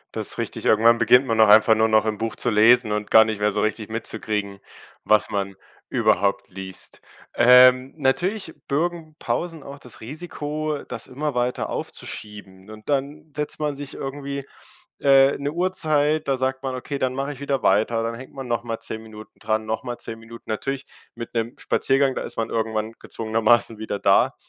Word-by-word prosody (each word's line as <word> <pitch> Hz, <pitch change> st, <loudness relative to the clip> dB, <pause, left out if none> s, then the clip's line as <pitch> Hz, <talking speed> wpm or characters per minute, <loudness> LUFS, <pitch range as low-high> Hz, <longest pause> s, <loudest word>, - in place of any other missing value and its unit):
Das -, -, -3 dB
ist -, -, -10 dB
richtig. -, -, -4 dB
Irgendwann 115 Hz, +2 st, +5 dB
beginnt 125 Hz, +3 st, +5 dB
man 115 Hz, -3 st, +2 dB
auch 110 Hz, -, +7 dB
einfach 110 Hz, +1 st, +7 dB
nur 110 Hz, 0 st, +3 dB
noch 110 Hz, 0 st, +3 dB
im 105 Hz, -1 st, -2 dB
Buch 115 Hz, -1 st, -3 dB
zu 120 Hz, -, -1 dB
lesen 110 Hz, +2 st, +5 dB
und 105 Hz, 0 st, -2 dB
gar 110 Hz, 0 st, +7 dB
nicht 110 Hz, -2 st, -4 dB
mehr 105 Hz, 0 st, +2 dB
so 105 Hz, +1 st, -1 dB
richtig 110 Hz, 0 st, -2 dB
mitzukriegen, 105 Hz, -3 st, -4 dB, 0.5 s
was 105 Hz, 0 st, +3 dB
man 100 Hz, -1 st, -2 dB, 0.3 s
überhaupt 100 Hz, +2 st, +1 dB
liest. 95 Hz, -1 st, -9 dB, 0.3 s
Ähm, 125 Hz, +2 st, +6 dB
natürlich 175 Hz, +6 st, 0 dB
bürgen 160 Hz, +1 st, -2 dB
Pausen 165 Hz, -4 st, -3 dB
auch 140 Hz, 0 st, -10 dB
das 125 Hz, -, -13 dB
Risiko, 150 Hz, +2 st, -4 dB
das 115 Hz, -2 st, -7 dB
immer 145 Hz, +3 st, -3 dB
weiter 125 Hz, 0 st, -1 dB
aufzuschieben. 105 Hz, -2 st, -8 dB
Und 110 Hz, +3 st, -12 dB
dann 145 Hz, +2 st, -2 dB
setzt 150 Hz, 0 st, -3 dB
man 150 Hz, -2 st, -1 dB
sich 140 Hz, 0 st, -7 dB
irgendwie, 140 Hz, 0 st, -5 dB, 0.5 s
äh, 135 Hz, 0 st, +5 dB
'ne 140 Hz, +1 st, -2 dB
Uhrzeit, 155 Hz, -3 st, 0 dB
da 135 Hz, -1 st, +1 dB
sagt 130 Hz, +1 st, -1 dB
man: 130 Hz, -1 st, -3 dB
„Okay, 140 Hz, +2 st, -5 dB
dann 130 Hz, 0 st, -1 dB
mache 140 Hz, +2 st, -3 dB
ich 135 Hz, -, -14 dB
wieder 140 Hz, -1 st, -2 dB
weiter.“ 110 Hz, +4 st, +2 dB
Dann 115 Hz, 0 st, -2 dB
hängt 130 Hz, +3 st, -11 dB
man 135 Hz, -2 st, -7 dB
noch 120 Hz, -1 st, -1 dB
mal 115 Hz, -1 st, -4 dB
10 110 Hz, -, -6 dB
Minuten 110 Hz, -1 st, -13 dB
dran, 110 Hz, 0 st, -1 dB
noch 110 Hz, +5 st, -3 dB
mal 120 Hz, -2 st, -5 dB
10 115 Hz, 0 st, -8 dB
Minuten. 115 Hz, +1 st, -12 dB
Natürlich 135 Hz, +5 st, -3 dB, 0.3 s
mit 115 Hz, 0 st, -8 dB
'nem 115 Hz, +1 st, -2 dB
Spaziergang, 135 Hz, 0 st, +1 dB
da -, -, -4 dB
ist -, -, -7 dB
man 115 Hz, 0 st, -1 dB
irgendwann 110 Hz, -1 st, -2 dB
gezwungenermaßen 115 Hz, 0 st, +1 dB
wieder 110 Hz, -2 st, -3 dB
da. -, -, +3 dB
120 Hz, 190 wpm, -23 LUFS, 110-140 Hz, 0.5 s, auch